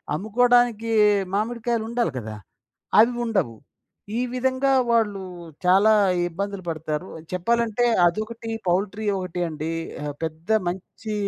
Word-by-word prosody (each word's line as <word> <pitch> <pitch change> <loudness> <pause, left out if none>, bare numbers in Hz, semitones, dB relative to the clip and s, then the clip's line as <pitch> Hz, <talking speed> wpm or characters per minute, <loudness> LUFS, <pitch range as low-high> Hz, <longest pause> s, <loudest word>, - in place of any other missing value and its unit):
అమ్ముకోవడానికి 230 +2 +2 0.4
మామిడికాయలుండాలి 230 0 -1
కదా! 110 -2 -7 0.6
అవి 230 +3 +6
ఉండవు. 190 - -1 0.6
ఈ - - +1
విధంగా 260 +2 +1 0.2
వాళ్ళు 210 -4 +1 0.4
చాలా 195 +4 +5 0.4
ఇబ్బందులు 200 +3 -4
పడతారు. 155 +2 -3 0.2
చెప్పాలంటే 230 +5 +1 0.2
అదొకటి, 220 +5 -2 0.2
పౌల్ట్రీ 200 +4 0
ఒకటి 180 -1 -4
అండి. 155 0 -4 0.3
ఆహ్, 145 -1 -4
పెద్ద 160 +4 -6 0.2
మంచి 190 +4 -6
210 Hz, 100 wpm, -24 LUFS, 175-235 Hz, 0.6 s, అవి